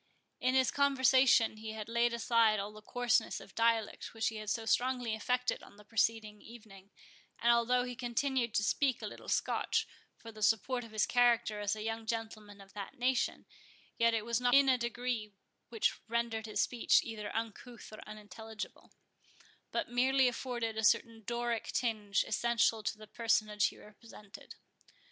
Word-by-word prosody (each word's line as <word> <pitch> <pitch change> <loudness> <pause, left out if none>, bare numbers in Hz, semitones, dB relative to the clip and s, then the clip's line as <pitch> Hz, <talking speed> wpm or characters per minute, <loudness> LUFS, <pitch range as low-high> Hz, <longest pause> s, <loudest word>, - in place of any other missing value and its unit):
In 255 +1 +1
his 260 -2 +3
conversation, 260 -5 +4
he 220 0 -7
had 215 -1 -6
laid 235 +1 +2
aside 230 -2 +3
all 200 +1 -4
the 215 - -12
coarseness 245 +2 0
of 195 - -14
dialect 230 -1 0
which 220 0 0
he 220 - -7
had 215 -1 -6
so 225 +1 -1
strongly 245 -1 +1
affected 250 +3 -1
on - - -16
the 210 - -16
preceding 215 -1 0
evening; 210 -4 -14 0.5
and 235 - +3
although 245 +1 +2
he 250 0 -5
continued 245 -1 -1
to 210 - +2
speak 260 +4 +1
a - - -2
little - - -9
Scotch, - - 0 0.3
for 225 - -11
the 215 -1 -13
support 225 +4 +1
of 230 - -12
his 215 -1 +1
character 235 -3 +2
as 205 0 -1
a 215 - -6
young 225 0 -4
gentleman 220 -2 -5
of 195 0 -16
that 200 -2 -8
nation, 250 0 0 0.5
yet 230 0 +4
it 220 -1 -2
was 235 +1 0
not 245 0 +4
in 275 0 +6
a 260 - +5
degree 235 -3 -3 0.4
which 225 -2 0
rendered 230 -1 -2
his 215 - 0
speech 240 -2 +2
either 215 -3 -6
uncouth 230 +1 -6
or 215 - -9
unintelligible, 215 +1 -9 0.8
but - - -2
merely 260 +2 +3
afforded 240 -2 -3
a 220 - -2
certain 225 +1 +2
Doric 235 -1 -2
tinge 210 -5 0
essential 230 -1 +1
to 215 - -3
the 215 - -11
personage 215 -2 +1
he - - -8
represented. 210 -1 -14
230 Hz, 170 wpm, -33 LUFS, 215-245 Hz, 0.8 s, in